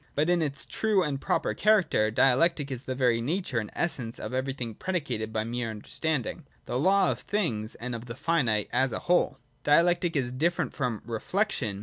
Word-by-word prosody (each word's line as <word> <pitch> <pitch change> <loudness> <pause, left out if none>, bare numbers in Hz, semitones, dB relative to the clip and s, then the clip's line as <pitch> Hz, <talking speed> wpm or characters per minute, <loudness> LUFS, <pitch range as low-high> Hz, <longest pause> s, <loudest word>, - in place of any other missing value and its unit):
But 155 +4 +2
in 175 -1 +3
its 140 -3 -2
true 215 -4 +1
and 140 -4 -2
proper - - 0
character, 200 - +3
Dialectic 140 +5 +3
is 130 0 -5
the 130 - -3
very 125 -3 +2
nature 150 -1 -1
and 105 -2 -5
essence 125 -9 -2
of - - -6
everything 130 -3 -2
predicated 140 - -3
by 110 -1 -1
mere 120 +1 -3
understanding, 125 +5 -3
— - - -36
the 125 - -2
law 195 +6 +4
of - - -4
things 115 - -1
and 125 +1 -5
of 115 +1 -6
the 115 - -6
finite 120 -12 +1
as 130 0 +2
a - - -2
whole. 175 -6 +2 0.3
Dialectic 170 +3 +3
is 125 -4 0
different 165 +7 0
from 125 -6 -2
' - - -25
Reflection.' 115 - -1
135 Hz, 195 wpm, -28 LUFS, 115-170 Hz, 0.3 s, law